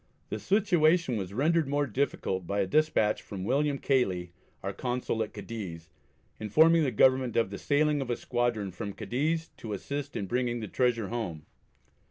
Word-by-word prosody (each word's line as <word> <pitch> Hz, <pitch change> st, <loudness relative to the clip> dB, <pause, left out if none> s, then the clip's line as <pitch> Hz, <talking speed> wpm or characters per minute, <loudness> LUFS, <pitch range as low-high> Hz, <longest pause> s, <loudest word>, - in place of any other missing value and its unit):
The -, -, -3 dB
situation 175 Hz, -, +3 dB
was 95 Hz, -3 st, -3 dB
rendered 155 Hz, +7 st, +2 dB
more 145 Hz, +1 st, +1 dB
difficult 100 Hz, -8 st, -2 dB
by 100 Hz, 0 st, 0 dB
a -, -, +1 dB
despatch 130 Hz, -3 st, +2 dB
from 95 Hz, -2 st, -7 dB
William 140 Hz, +6 st, +1 dB
Cayley, 95 Hz, -12 st, 0 dB, 0.3 s
our -, -, -3 dB
Consul 125 Hz, -2 st, -2 dB
at 110 Hz, -, -2 dB
Cadiz, 85 Hz, -8 st, -7 dB, 0.5 s
informing 160 Hz, +10 st, +5 dB
the 145 Hz, -, +2 dB
Government 130 Hz, +1 st, +3 dB
of 115 Hz, -4 st, +2 dB
the 100 Hz, -, -6 dB
sailing 150 Hz, 0 st, +2 dB
of 130 Hz, -, -4 dB
a 120 Hz, -, 0 dB
squadron 120 Hz, -5 st, -1 dB
from 100 Hz, +3 st, -5 dB
Cadiz 150 Hz, +11 st, -1 dB
to 110 Hz, -2 st, -6 dB
assist 140 Hz, +7 st, -5 dB
in 100 Hz, -, -2 dB
bringing 120 Hz, +3 st, -1 dB
the 110 Hz, -, -5 dB
treasure 115 Hz, -2 st, 0 dB
home. 90 Hz, -11 st, -4 dB
120 Hz, 170 wpm, -29 LUFS, 100-145 Hz, 0.5 s, informing